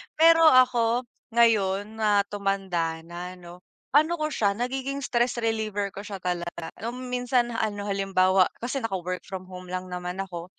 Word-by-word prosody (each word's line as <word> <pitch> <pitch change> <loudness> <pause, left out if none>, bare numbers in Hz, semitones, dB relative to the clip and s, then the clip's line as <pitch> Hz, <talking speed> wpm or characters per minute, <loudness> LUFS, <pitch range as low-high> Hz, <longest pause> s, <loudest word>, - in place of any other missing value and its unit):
Pero 330 0 +7
ako, 250 -3 +4 0.3
ngayon 215 -2 +2
na 205 -2 +3
tumanda 190 -5 -1
na 175 +2 -7
'no, 175 0 -12 0.3
ano 310 +4 +4
ko 305 - 0
siya, 205 -8 +1
nagiging 265 +5 -3
stress 245 -2 +1
reliever 215 -3 -1
ko 200 +1 -9
siya 200 -3 -7
talaga, 175 -2 -3
nung 250 +3 -6
minsan 250 -1 +1
ano, 210 -3 -2
halimbawa, 190 -1 +3 0.2
kasi 245 +3 -2
naka-work 185 -7 -3
from 185 -2 -7
home 185 0 -9
lang 185 0 -5
naman 180 +1 -4
ako, 175 -3 -6
205 Hz, 155 wpm, -26 LUFS, 185-240 Hz, 0.3 s, Pero